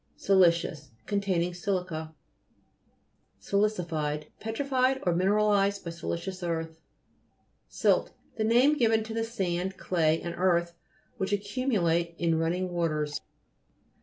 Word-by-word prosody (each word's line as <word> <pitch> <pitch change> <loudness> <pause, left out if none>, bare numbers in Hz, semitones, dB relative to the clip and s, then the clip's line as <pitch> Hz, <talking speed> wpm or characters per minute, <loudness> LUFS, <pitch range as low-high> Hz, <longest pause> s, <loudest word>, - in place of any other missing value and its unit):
SILI'CIOUS 170 -6 +3 0.2
Containing 190 -4 0
silica. 175 -4 -3 1.2
SILI'CIFIED 165 -8 -1
Petrified 260 +3 0
or 175 - +2
mineralized 200 +2 +2
by 170 - -3
silicious 170 +2 -5
earth. 165 -2 -3 0.9
SILT - - +2 0.3
The 220 - -1
name 245 +7 +4
given 225 -5 +3
to 220 +1 -7
the 225 0 -1
sand, 190 -4 -2
clay, 160 -3 +1
and 170 - -5
earth 170 -2 +2 0.4
which 190 - -2
accumulate 200 -6 0
in 165 -2 +1
running 180 +3 -1
waters. 155 -4 -1
180 Hz, 105 wpm, -28 LUFS, 170-210 Hz, 1.2 s, name